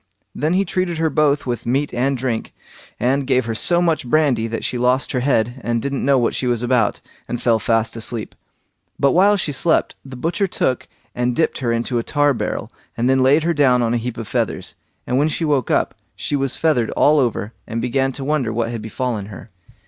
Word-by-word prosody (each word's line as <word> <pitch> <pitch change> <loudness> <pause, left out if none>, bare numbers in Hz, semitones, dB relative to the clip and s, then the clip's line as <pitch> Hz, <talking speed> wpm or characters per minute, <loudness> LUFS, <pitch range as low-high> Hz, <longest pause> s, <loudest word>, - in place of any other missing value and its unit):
Then 155 +3 -1
he 195 +2 +2
treated 180 -1 -1
her 160 -1 +1
both 145 -1 +2
with 120 -2 -3
meat 140 +4 0
and 135 +2 0
drink, 120 -3 -3 0.4
and 135 +3 +1
gave 130 -2 +2
her 115 - -2
so 175 +10 +3
much 160 -7 0
brandy 140 -7 +2
that 115 0 -4
she 125 - -2
lost 125 +2 +2
her 125 - 0
head, 125 -1 0
and 120 0 0
didn't 140 +2 -3
know 140 0 +4
what 120 -2 +1
she 130 - -2
was 120 -1 0
about, 120 -3 +1 0.3
and 120 - -3
fell 115 -2 +2
fast 115 +1 0
asleep. 115 -1 -3 0.7
But 140 - +4
while 200 +4 +4
she 165 - -1
slept, 160 +4 +2
the 135 -1 -10
butcher 170 - -1
took 130 -7 -1 0.3
and 125 0 -1
dipped 160 - 0
her 120 -4 -1
into 120 +1 -1
a - - -3
tar 145 +1 +2
barrel, 115 - -4 0.3
and 120 +1 +1
then 130 0 +3
laid 140 +4 +4
her 170 +1 +1
down 130 -5 +3
on 115 0 0
a - - +2
heap 120 0 -5
of 115 -2 -6
feathers; - - -2 0.3
and 125 - 0
when 150 - +3
she 160 +2 -2
woke 140 -5 +1
up, - - +1 0.2
she - - -2
was 135 -2 -1
feathered 140 -8 +1
all 150 +1 +5
over, 115 -4 -1
and 115 - -3
began 130 +3 0
to 135 - -6
wonder 135 -5 0
what 115 +1 -1
had 115 -2 -5
befallen 110 -2 -3
her. 100 -5 -11
130 Hz, 220 wpm, -20 LUFS, 120-145 Hz, 0.7 s, all